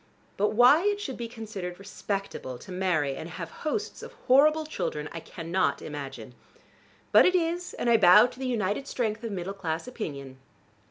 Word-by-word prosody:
But 210 Hz, +2 st, +1 dB
why 250 Hz, +8 st, +6 dB
it 410 Hz, 0 st, +1 dB
should 270 Hz, -11 st, -5 dB
be 235 Hz, -, -5 dB
considered 210 Hz, -6 st, -7 dB
respectable 195 Hz, -9 st, -5 dB
to 185 Hz, -, -12 dB
marry 175 Hz, -7 st, 0 dB
and 160 Hz, -, -7 dB
have 170 Hz, 0 st, -7 dB
hosts 405 Hz, +8 st, -3 dB
of -, -, -10 dB
horrible 305 Hz, +4 st, +5 dB
children 150 Hz, -, -3 dB
I 165 Hz, -, -6 dB
cannot 165 Hz, -1 st, -1 dB
imagine. 135 Hz, -5 st, -7 dB, 0.8 s
But -, -, +7 dB
it 365 Hz, -, +2 dB
is, 345 Hz, +1 st, -1 dB
and -, -, -3 dB
I 235 Hz, -1 st, +6 dB
bow 180 Hz, -1 st, +8 dB
to 250 Hz, -, -7 dB
the 265 Hz, -, -3 dB
united 225 Hz, +2 st, -1 dB
strength 225 Hz, -4 st, -2 dB
of 230 Hz, -, -4 dB
middle 190 Hz, 0 st, -4 dB
class 165 Hz, -1 st, -4 dB
opinion. 140 Hz, -, -7 dB
200 Hz, 175 wpm, -27 LUFS, 165-250 Hz, 0.8 s, bow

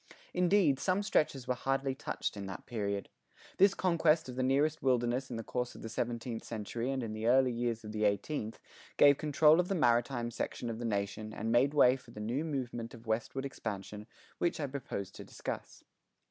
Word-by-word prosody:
Indeed, 180 Hz, -6 st, +3 dB
some 190 Hz, +5 st, +1 dB
stretches 140 Hz, -9 st, +1 dB
were 125 Hz, -, +2 dB
hardly 135 Hz, +1 st, -1 dB
touched 135 Hz, -4 st, -3 dB
in 100 Hz, -1 st, -5 dB
that 95 Hz, -, -7 dB
period. 100 Hz, -4 st, -2 dB, 0.5 s
This 195 Hz, +1 st, +6 dB
conquest 165 Hz, -3 st, +3 dB
of 125 Hz, -, -7 dB
the 130 Hz, -, -1 dB
nearest 145 Hz, +4 st, +2 dB
wilderness 125 Hz, 0 st, +1 dB
in 120 Hz, -, -4 dB
the 115 Hz, -, -4 dB
course 125 Hz, +2 st, -3 dB
of -, -, -10 dB
the 115 Hz, -, -5 dB
seventeenth 115 Hz, 0 st, -3 dB
century 115 Hz, +2 st, -4 dB
and 135 Hz, -2 st, -1 dB
in 110 Hz, -2 st, -4 dB
the 110 Hz, +1 st, -2 dB
early 130 Hz, +1 st, +5 dB
years 115 Hz, -1 st, -2 dB
of 105 Hz, -, -7 dB
the 110 Hz, 0 st, -2 dB
eighteenth, 110 Hz, +3 st, -1 dB, 0.4 s
gave 145 Hz, -1 st, +7 dB
control 155 Hz, +1 st, +5 dB
of 180 Hz, -, +2 dB
the 195 Hz, -, 0 dB
maritime 120 Hz, -4 st, +2 dB
section 120 Hz, +1 st, -3 dB
of 115 Hz, -, -6 dB
the 120 Hz, -, -3 dB
nation 105 Hz, 0 st, -2 dB
and 110 Hz, +2 st, -2 dB
made 135 Hz, +5 st, +3 dB
way 130 Hz, -2 st, +6 dB
for 125 Hz, -, -18 dB
the 110 Hz, -, -10 dB
new 120 Hz, +8 st, -1 dB
movement 120 Hz, -6 st, -4 dB
of 115 Hz, 0 st, -14 dB
westward 115 Hz, +4 st, -2 dB
expansion 105 Hz, -5 st, -6 dB, 0.3 s
which 175 Hz, -, 0 dB
I 150 Hz, -, 0 dB
propose 130 Hz, -8 st, -5 dB
to -, -, -10 dB
discuss. -, -, -7 dB
125 Hz, 200 wpm, -32 LUFS, 115-140 Hz, 0.5 s, gave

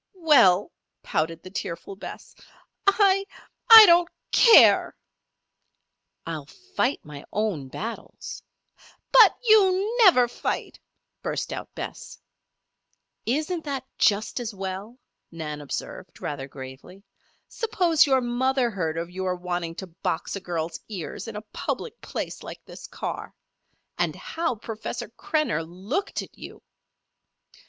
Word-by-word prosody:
"Well," 240 Hz, -, +4 dB, 0.3 s
pouted 165 Hz, +1 st, -2 dB
the 185 Hz, -, -10 dB
tearful 190 Hz, 0 st, -5 dB
Bess, 195 Hz, -, -10 dB, 0.5 s
"I 395 Hz, -1 st, +4 dB, 0.5 s
I 450 Hz, -1 st, +13 dB
don't 345 Hz, -1 st, +5 dB, 0.2 s
care!" 465 Hz, -, +6 dB, 1.3 s
"I'll 155 Hz, -4 st, -5 dB
fight 370 Hz, -, -2 dB
my 145 Hz, -1 st, -10 dB
own 205 Hz, -10 st, -2 dB
battles." 225 Hz, -, -7 dB, 0.7 s
"But 460 Hz, -5 st, +7 dB
you 420 Hz, -1 st, +4 dB
never 255 Hz, -, +6 dB
fight!" 240 Hz, -, -4 dB, 0.4 s
burst -, -, -3 dB
out -, -, -8 dB
Bess. -, -, -8 dB, 1.1 s
"Isn't 310 Hz, +7 st, -1 dB
that 275 Hz, -3 st, -4 dB
just 210 Hz, +4 st, +2 dB
as 230 Hz, -3 st, -5 dB
well?" 195 Hz, +5 st, -6 dB, 0.3 s
Nan 155 Hz, -3 st, -6 dB
observed, 145 Hz, -, -7 dB
rather 135 Hz, -2 st, -5 dB
gravely. 135 Hz, +8 st, -11 dB, 0.4 s
"Suppose 355 Hz, -9 st, +2 dB
your 265 Hz, -2 st, +3 dB
mother 250 Hz, +1 st, 0 dB
heard 165 Hz, -5 st, -3 dB
of 170 Hz, +1 st, -4 dB
your 185 Hz, 0 st, -2 dB
wanting 175 Hz, -2 st, -4 dB
to 190 Hz, -, -6 dB
box 170 Hz, 0 st, -4 dB
a -, -, -4 dB
girl's 170 Hz, -3 st, -4 dB
ears 190 Hz, +1 st, -6 dB
in 225 Hz, -, -7 dB
a 210 Hz, -, -6 dB
public 470 Hz, 0 st, -4 dB
place -, -, -5 dB
like -, -, -10 dB
this -, -, -11 dB
car? -, -, -6 dB, 0.6 s
And -, -, 0 dB
how 330 Hz, -6 st, -3 dB
Professor 225 Hz, +2 st, -6 dB
Krenner 290 Hz, -, -1 dB
looked 190 Hz, -, -4 dB
at -, -, -15 dB
you!" -, -, -11 dB
220 Hz, 120 wpm, -25 LUFS, -, 1.3 s, I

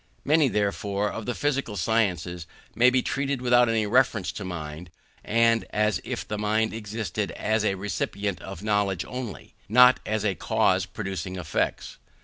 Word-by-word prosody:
Many, 155 Hz, 0 st, +4 dB
therefore, 100 Hz, -2 st, -1 dB
of 110 Hz, 0 st, -6 dB
the 120 Hz, -, -1 dB
physical 140 Hz, -7 st, -1 dB
sciences 90 Hz, -7 st, 0 dB, 0.3 s
may 125 Hz, +2 st, +5 dB
be 125 Hz, 0 st, +1 dB
treated 140 Hz, 0 st, -1 dB
of 125 Hz, -, -10 dB
without 120 Hz, -1 st, +4 dB
any 110 Hz, -1 st, +1 dB
reference 110 Hz, -4 st, +2 dB
to 100 Hz, -, -7 dB
mind, 80 Hz, -2 st, -6 dB, 0.3 s
and 115 Hz, 0 st, +3 dB
as 105 Hz, 0 st, +1 dB
if -, -, -5 dB
the 105 Hz, -, -3 dB
mind 110 Hz, +1 st, +1 dB
existed 110 Hz, -1 st, -3 dB
as 110 Hz, 0 st, 0 dB
a 100 Hz, -2 st, +1 dB
recipient 100 Hz, 0 st, -3 dB
of 95 Hz, -1 st, -8 dB
knowledge 100 Hz, -4 st, 0 dB
only, 125 Hz, -4 st, -7 dB, 0.2 s
not 125 Hz, +3 st, +7 dB
as 110 Hz, 0 st, -2 dB
a 100 Hz, -, +2 dB
cause -, -, +1 dB
producing 95 Hz, -1 st, -5 dB
effects. 80 Hz, -4 st, -2 dB
105 Hz, 160 wpm, -26 LUFS, 95-115 Hz, 0.3 s, not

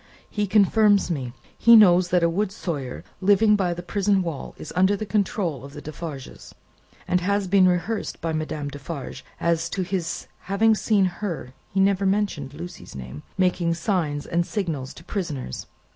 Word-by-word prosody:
He 210 Hz, -1 st, -1 dB
confirms 205 Hz, 0 st, +4 dB
me. 130 Hz, -6 st, -3 dB, 0.3 s
He 235 Hz, +1 st, +8 dB
knows 180 Hz, -4 st, +6 dB
that 180 Hz, -1 st, +3 dB
a -, -, +5 dB
wood 190 Hz, +4 st, 0 dB
sawyer, 145 Hz, -10 st, -5 dB, 0.2 s
living 205 Hz, +2 st, +5 dB
by 180 Hz, -4 st, 0 dB
the 175 Hz, -, -7 dB
prison 195 Hz, +1 st, +1 dB
wall, 165 Hz, -5 st, -5 dB
is -, -, -8 dB
under 190 Hz, +2 st, +4 dB
the 215 Hz, -, -4 dB
control 195 Hz, -, -1 dB
of 140 Hz, 0 st, -10 dB
the 145 Hz, -, -8 dB
Defarges, 155 Hz, -3 st, -8 dB, 0.5 s
and 180 Hz, -1 st, +2 dB
has 200 Hz, +1 st, 0 dB
been 185 Hz, 0 st, +5 dB
rehearsed 180 Hz, +5 st, -1 dB
by 165 Hz, -1 st, -2 dB
Madame 155 Hz, -2 st, -3 dB
Defarge 145 Hz, +1 st, -7 dB, 0.2 s
as 170 Hz, 0 st, +1 dB
to 190 Hz, +2 st, -2 dB
his 180 Hz, -2 st, -3 dB
having 215 Hz, +4 st, +2 dB
seen 210 Hz, -2 st, +2 dB
Her" 175 Hz, -8 st, -4 dB, 0.2 s
he 195 Hz, -, -1 dB
never 195 Hz, 0 st, +3 dB
mentioned 190 Hz, -9 st, -1 dB
Lucie's 175 Hz, -, -9 dB
name 65 Hz, +2 st, -8 dB, 0.2 s
"making 180 Hz, -2 st, +1 dB
signs 165 Hz, -5 st, -1 dB
and 170 Hz, +1 st, +1 dB
signals 165 Hz, -10 st, -3 dB
to 165 Hz, -, -12 dB
prisoners. 155 Hz, -, -4 dB
180 Hz, 170 wpm, -24 LUFS, 155-200 Hz, 0.5 s, He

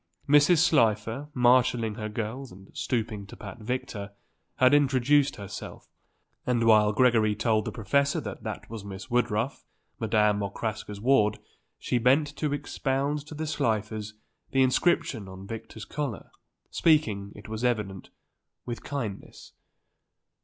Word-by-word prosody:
Mrs. 150 Hz, +4 st, +6 dB
Slifer, 115 Hz, -4 st, +2 dB
marshalling 120 Hz, -2 st, +3 dB
her 105 Hz, 0 st, -5 dB
girls, 115 Hz, +5 st, -5 dB
and 95 Hz, +1 st, -15 dB
stooping 110 Hz, -4 st, -2 dB
to -, -, -11 dB
pat 105 Hz, +2 st, -9 dB
Victor, 105 Hz, -3 st, -4 dB, 0.5 s
was 130 Hz, +1 st, +6 dB
introducing 140 Hz, 0 st, +3 dB
herself, 100 Hz, 0 st, -8 dB, 0.5 s
and 120 Hz, -2 st, +1 dB
while 105 Hz, -2 st, +5 dB
Gregory 110 Hz, -2 st, +3 dB
told 110 Hz, 0 st, +1 dB
the -, -, -3 dB
professor 140 Hz, +5 st, +1 dB
that -, -, -7 dB
that -, -, -6 dB
was 110 Hz, -2 st, -7 dB
Miss 100 Hz, +5 st, -9 dB
Woodruff, 120 Hz, +1 st, 0 dB, 0.4 s
Madame 105 Hz, -1 st, +2 dB
Okraska's 105 Hz, 0 st, -4 dB
ward, 110 Hz, -3 st, +3 dB, 0.4 s
she 125 Hz, -, -1 dB
bent 145 Hz, +5 st, +3 dB
to 150 Hz, -2 st, -1 dB
expound 145 Hz, 0 st, -2 dB
to 155 Hz, -, -8 dB
the 160 Hz, +1 st, -3 dB
Slifers 110 Hz, -6 st, -2 dB, 0.3 s
the 135 Hz, 0 st, +3 dB
inscription 130 Hz, -, +1 dB
on 95 Hz, 0 st, -10 dB
Victor's 110 Hz, +1 st, -8 dB
collar, 140 Hz, -8 st, -5 dB, 0.4 s
speaking, 110 Hz, -12 st, +2 dB
it 105 Hz, -, -11 dB
was 110 Hz, +1 st, -5 dB
evident, 105 Hz, -6 st, -1 dB, 0.6 s
with 120 Hz, -1 st, -5 dB
kindness. 115 Hz, -9 st, -6 dB
115 Hz, 130 wpm, -27 LUFS, 105-135 Hz, 0.6 s, Mrs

